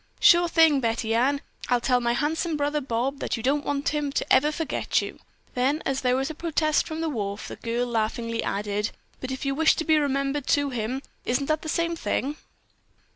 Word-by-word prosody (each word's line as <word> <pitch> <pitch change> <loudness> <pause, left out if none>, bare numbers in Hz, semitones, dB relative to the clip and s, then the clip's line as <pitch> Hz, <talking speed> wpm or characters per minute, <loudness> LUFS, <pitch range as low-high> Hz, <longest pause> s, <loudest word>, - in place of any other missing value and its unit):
"Sure 345 0 +6
thing, 325 -4 +5
Betty 225 -2 -1
Ann. 270 +5 +2 0.3
I'll 245 -1 +3
tell 250 +1 +2
my 235 0 +1
handsome 315 +4 0
brother 290 +1 0
Bob 265 +2 -2
that - - -2
you 225 - -7
don't 285 +3 +1
want 285 -1 -1
him 295 -1 -1
to - - +1
ever 295 +3 +4
forget 320 0 -1
you." - - -6 0.3
Then 270 +5 +1
as 270 -1 -1
there 250 -1 +2
was 270 +4 -1
a - - -6
protest 310 -1 +1
from 315 0 -4
the 330 - -1
wharf, 205 -6 -4
the - - -7
girl 235 +1 -2
laughingly 230 0 -1
added: 205 +1 -1 0.3
"But 260 +1 -5
you 275 - +1
wished 315 +3 +3
to 320 - -2
be 315 -1 +4
remembered 275 -1 -1
to 285 -1 +2
him. 245 +3 -3 0.2
Isn't 255 +3 0
that 310 +1 0
the 315 - -6
same 335 +1 0
thing?" 295 -2 -2
275 Hz, 205 wpm, -25 LUFS, 240-305 Hz, 0.3 s, Sure